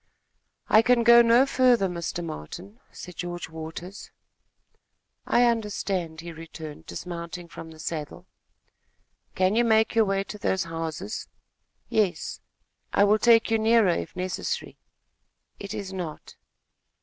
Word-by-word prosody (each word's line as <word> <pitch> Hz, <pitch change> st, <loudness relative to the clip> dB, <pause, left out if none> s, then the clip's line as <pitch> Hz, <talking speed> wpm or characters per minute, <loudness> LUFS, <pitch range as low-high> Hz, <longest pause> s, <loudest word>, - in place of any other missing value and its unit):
"I 215 Hz, -, +6 dB
can 235 Hz, +1 st, +3 dB
go 235 Hz, 0 st, +8 dB
no 235 Hz, +3 st, +5 dB
further, 250 Hz, -6 st, +3 dB
Mr. 175 Hz, -1 st, -4 dB
Martin," 175 Hz, -, -8 dB
said 180 Hz, -2 st, -10 dB
George 175 Hz, -1 st, -5 dB
Waters. 160 Hz, +4 st, -8 dB, 1.2 s
"I 245 Hz, -, +4 dB
understand," 200 Hz, -8 st, -1 dB
he 170 Hz, 0 st, -8 dB
returned, 160 Hz, -2 st, -10 dB
dismounting 170 Hz, 0 st, -6 dB
from 165 Hz, -1 st, -10 dB
the 160 Hz, -, -13 dB
saddle. 155 Hz, -1 st, -5 dB, 1.1 s
"Can 185 Hz, +2 st, +2 dB
you 240 Hz, -, +4 dB
make 220 Hz, -1 st, +3 dB
your 225 Hz, -2 st, +4 dB
way 195 Hz, 0 st, 0 dB
to 210 Hz, +1 st, -9 dB
those 190 Hz, -1 st, 0 dB
houses?" 165 Hz, +5 st, -5 dB, 0.6 s
"Yes." 215 Hz, -6 st, -1 dB, 0.5 s
"I 200 Hz, -, +4 dB
will 210 Hz, +1 st, +4 dB
take 230 Hz, 0 st, +5 dB
you 225 Hz, -, +3 dB
nearer, 225 Hz, -2 st, +4 dB
if 175 Hz, -, -2 dB
necessary." 185 Hz, 0 st, -3 dB, 0.8 s
"It 200 Hz, -, -7 dB
is 195 Hz, -1 st, -5 dB
not." 170 Hz, -5 st, -7 dB
190 Hz, 130 wpm, -26 LUFS, 170-225 Hz, 1.2 s, go